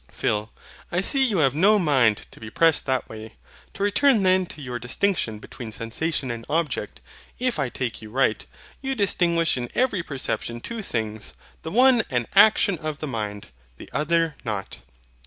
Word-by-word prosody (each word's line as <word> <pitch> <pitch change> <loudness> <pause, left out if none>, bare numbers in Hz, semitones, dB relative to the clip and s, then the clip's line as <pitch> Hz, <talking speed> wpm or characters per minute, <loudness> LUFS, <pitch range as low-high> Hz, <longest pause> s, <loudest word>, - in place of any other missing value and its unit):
PHIL. 105 +1 -1 0.4
I 175 - +1
see 270 +8 +3
you 225 -7 +1
have 135 -5 +3
no 200 +8 +4
mind 130 - +2
to - - -14
be 110 - -8
pressed 165 +5 +2
that 130 -1 0
way. 110 0 -10 0.4
To 200 - -3
return 215 +2 +3
then 185 -1 +3
to - - -10
your 125 -4 -5
distinction 125 - -1
between 110 +2 -9
SENSATION 130 +5 -3
and 115 -1 -6
OBJECT; 160 +1 -2 0.4
if 255 -1 -1
I 135 - 0
take 120 -3 -4
you 110 - -10
right, 120 -1 +1 0.4
you 270 0 -2
distinguish 170 - +2
in 120 -1 -4
every 240 -7 +1
perception 130 -5 -4
two 230 - -6
things, 110 - -4 0.3
the 160 - -6
one 250 +4 +5
an 120 -3 0
action 200 -4 +5
of 155 -2 -4
the 155 - -5
mind, 105 - -4 0.3
the - - -12
other 165 +1 +1
not. 105 - -5
150 Hz, 175 wpm, -24 LUFS, 115-190 Hz, 0.4 s, one